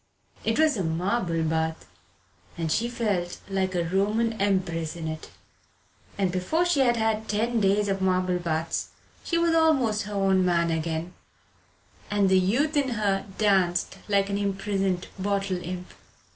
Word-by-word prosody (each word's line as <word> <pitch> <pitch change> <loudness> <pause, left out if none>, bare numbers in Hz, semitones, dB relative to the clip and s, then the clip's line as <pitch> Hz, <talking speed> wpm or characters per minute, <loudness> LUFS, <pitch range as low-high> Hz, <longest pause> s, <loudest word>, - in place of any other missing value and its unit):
It - - 0
was 310 -5 +3
a 190 - -1
marble 170 +1 0
bath, 160 0 -1 0.7
and 165 -2 -2
she 235 +7 +1
felt 205 -7 -1
like 190 -1 -1
a 175 - +1
Roman 210 +6 +1
empress 175 -5 0
in 165 -2 -5
it. 155 0 -6 0.9
And 195 -3 +1
before 185 - 0
she 350 -5 +2
had 240 -3 +3
had 220 -1 0
ten 230 +3 +1
days 200 +1 +2
of 195 -1 -1
marble 185 -1 +1
baths 165 -1 -2 0.4
she 335 - 0
was 335 0 +2
almost 275 -10 +3
her 210 - -5
own 195 -1 +3
man 170 -2 +2
again, 160 +2 -2 1.0
and 205 -2 +2
the 190 0 +5
youth 250 - +1
in 280 -2 +2
her 200 -2 0
danced 190 -5 +2
like 200 -1 +2
an 200 - 0
imprisoned 195 -2 -1
bottle 195 -2 -1
imp. 180 +1 -6
195 Hz, 155 wpm, -26 LUFS, 175-215 Hz, 1.0 s, the